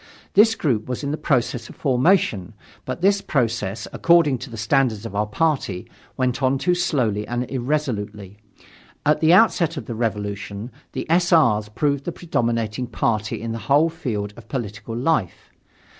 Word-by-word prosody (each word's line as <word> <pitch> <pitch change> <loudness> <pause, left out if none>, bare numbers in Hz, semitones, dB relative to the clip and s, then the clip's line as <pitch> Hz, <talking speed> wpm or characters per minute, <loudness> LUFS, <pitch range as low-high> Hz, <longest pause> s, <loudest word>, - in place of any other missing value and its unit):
This 220 +3 +6
group 120 - 0
was 125 +3 -3
in 140 - -1
the - - 0
process 125 -5 -1
of - - -12
formation, 130 - +1 0.3
but - - -5
this 200 +1 +3
process, 115 - -1
according 165 -6 +4
to 130 - -8
the 115 - -8
standards 115 -1 +1
of 115 - -6
our 105 +1 0
party, 130 - -1 0.3
went 130 0 0
on 130 +1 +2
too 180 +6 +1
slowly 125 - 0
and 120 +1 -1
irresolutely. 110 -7 -3 0.7
At 150 +1 +3
the 160 +1 +5
outset 175 -5 +4
of 130 - -5
the 120 - -5
Revolution, 105 0 -3 0.2
the - - -3
S. 170 +2 +2
R.'s 110 -11 +4
proved 140 +5 -1
the 175 - -2
predominating 120 -7 -2
party 110 -2 -1
in 115 - -3
the 115 - -4
whole 150 +4 +5
field 115 - -4
of - - -14
political 115 -2 -5
life. 120 - -1
125 Hz, 165 wpm, -22 LUFS, 110-155 Hz, 0.7 s, This